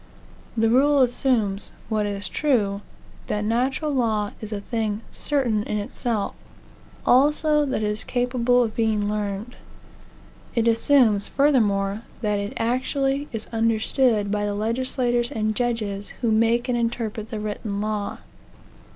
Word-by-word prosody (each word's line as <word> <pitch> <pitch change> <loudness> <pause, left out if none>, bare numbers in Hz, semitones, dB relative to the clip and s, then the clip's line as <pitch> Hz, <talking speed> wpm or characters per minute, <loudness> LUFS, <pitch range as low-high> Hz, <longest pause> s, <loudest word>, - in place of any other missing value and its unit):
The 225 0 +3
rule 275 +4 +4
assumes, 235 -5 0 0.2
what 215 -1 0
is 200 -1 -3
true, 205 - +1 0.5
that 210 0 -1
natural 260 +7 0
law 220 -6 0
is 215 0 -7
a 210 - -2
thing 215 0 -2
certain 250 -8 0
in 210 - -2
itself; 210 +1 -2 0.7
also 295 +3 +4
that 255 -5 -1
it - - +1
is 210 +1 -2
capable 245 0 +2
of 220 -2 -3
being 215 -2 +1
learned. 210 +2 -3 1.0
It 230 -1 +2
assumes, 230 -3 +4
furthermore, 210 -8 +2 0.2
that 210 -2 0
it 200 0 -4
actually 270 +4 0
is 225 -2 -5
understood 225 -1 +2
by 210 0 0
the 205 - -2
legislators 240 +2 0
and 215 0 -1
judges 215 -4 -2
who 235 -3 +2
make 230 +2 +2
and 250 - +1
interpret 230 -2 -2
the 220 - -4
written 210 -1 -4
law. 210 -1 -2
225 Hz, 135 wpm, -24 LUFS, 210-250 Hz, 1.0 s, rule